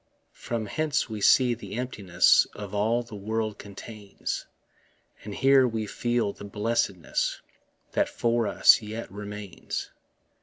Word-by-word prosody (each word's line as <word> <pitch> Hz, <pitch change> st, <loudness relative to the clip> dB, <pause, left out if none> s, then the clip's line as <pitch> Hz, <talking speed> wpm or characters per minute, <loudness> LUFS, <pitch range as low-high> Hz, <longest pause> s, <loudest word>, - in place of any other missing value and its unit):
From 115 Hz, -2 st, -4 dB
hence 150 Hz, +1 st, -1 dB
we 105 Hz, -1 st, -5 dB
see 125 Hz, +3 st, +5 dB
the 105 Hz, -4 st, -8 dB
emptiness 105 Hz, -8 st, +3 dB
Of 105 Hz, -1 st, -7 dB
all 110 Hz, +4 st, +1 dB
the 115 Hz, -, -14 dB
world 110 Hz, +1 st, -3 dB
contains; 100 Hz, 0 st, -6 dB, 0.8 s
And 105 Hz, -1 st, -7 dB
here 135 Hz, -1 st, +5 dB
we 110 Hz, -2 st, -2 dB
feel 120 Hz, -1 st, -1 dB
the -, -, -12 dB
blessedness 105 Hz, -3 st, -1 dB, 0.5 s
That -, -, +1 dB
for 115 Hz, -1 st, 0 dB
us -, -, +6 dB
yet 110 Hz, +2 st, -6 dB
remains. 105 Hz, -2 st, -6 dB
110 Hz, 125 wpm, -27 LUFS, 100-120 Hz, 0.8 s, us